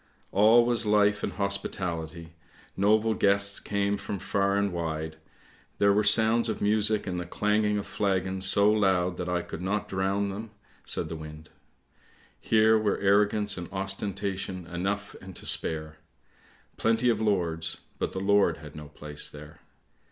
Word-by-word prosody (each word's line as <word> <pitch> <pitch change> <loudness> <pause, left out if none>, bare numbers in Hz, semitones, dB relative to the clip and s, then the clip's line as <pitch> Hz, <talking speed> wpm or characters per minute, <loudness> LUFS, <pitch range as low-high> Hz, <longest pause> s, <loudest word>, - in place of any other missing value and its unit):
All 110 +4 +5
was 120 -2 0
life 105 0 +3
and 100 - -3
hospitality, 85 -4 -3 0.4
noble 110 +3 +2
guests 100 -1 +2
came 100 0 -1
from 100 0 -5
far 100 +1 0
and 100 -2 0
wide; 80 -2 -4 0.6
there 100 0 +4
were 105 +1 +2
sounds 110 +2 +3
of 110 - -3
music 105 +1 +1
and 90 -2 -3
the 90 - -5
clanging 105 +2 +1
of 100 - -4
flagons, 95 -1 +1
so 100 +2 +6
loud 95 -4 +1
that 90 0 -4
I 90 -1 -1
could - - -8
not 100 +3 -2
drown 95 +1 -1
them! 105 +3 -6 0.2
" - - -32
said - - 0
the 80 - -6
wind. 80 0 -10 0.5
" - - -31
Here 110 0 +5
were 105 -2 0
arro 100 +1 +3
gance 105 -2 -2
and 85 - -8
ostentation 95 -1 -3
enough 95 +4 -4
and 95 -1 -11
to - - -10
spare; 80 -1 -1 0.8
plenty 115 +2 +2
of 115 - +1
lords, 85 -6 -1 0.2
but - - -2
the 95 - -4
Lord 100 +1 +2
had 75 -2 -12
no 75 0 -9
place 75 0 -6
there. 75 +1 -12
100 Hz, 165 wpm, -27 LUFS, 90-105 Hz, 0.8 s, so